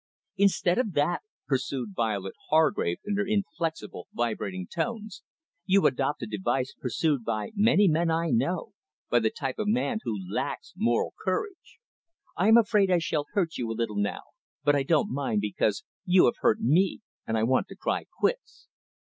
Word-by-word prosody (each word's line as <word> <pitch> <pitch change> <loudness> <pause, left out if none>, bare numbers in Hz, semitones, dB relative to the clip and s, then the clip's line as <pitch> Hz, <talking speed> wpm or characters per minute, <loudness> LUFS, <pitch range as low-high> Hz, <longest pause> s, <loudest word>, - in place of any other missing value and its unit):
"Instead 190 -1 +2
of 220 -7 -1
that," 150 +4 +1 0.2
pursued 130 -4 -2
Violet 100 -4 -1 0.2
Hargrave 155 - +2
in 205 -1 -1
her 205 - +2
inflexible, 170 - -3
vibrating 100 -6 -2
tones, 215 - -4 0.5
"you 195 0 +4
adopt 135 0 +1
a - - -1
device 115 +5 -2
pursued 140 +1 -1
by 110 - -2
many 210 -1 +4
men 165 +1 +2
I 165 +1 0
know, 200 -3 0 0.4
by 120 - +5
the 110 -1 +1
type 135 +3 -5
of 215 - -1
man 230 +1 +1
who 110 -3 -2
lacks - - -4
moral 120 0 +1
courage. 370 - -3 0.6
I 185 - +1
am 225 +1 +8
afraid 205 -3 +3
I 180 - +4
shall 155 -3 -1
hurt 175 -6 0
you 120 -2 -2
a 115 - -4
little 115 -3 -2
now, 100 0 -2 0.4
but 145 0 +4
I 140 - +2
don't 150 -1 +1
mind 130 -6 0
because 105 0 0 0.2
you 185 -1 +5
have 120 - +2
hurt 110 - +3
me, 175 - +2 0.3
and 110 - 0
I 110 - +1
want 130 +3 +2
to - - -10
cry - - -2
quits. - - -2
155 Hz, 170 wpm, -27 LUFS, 115-195 Hz, 0.6 s, am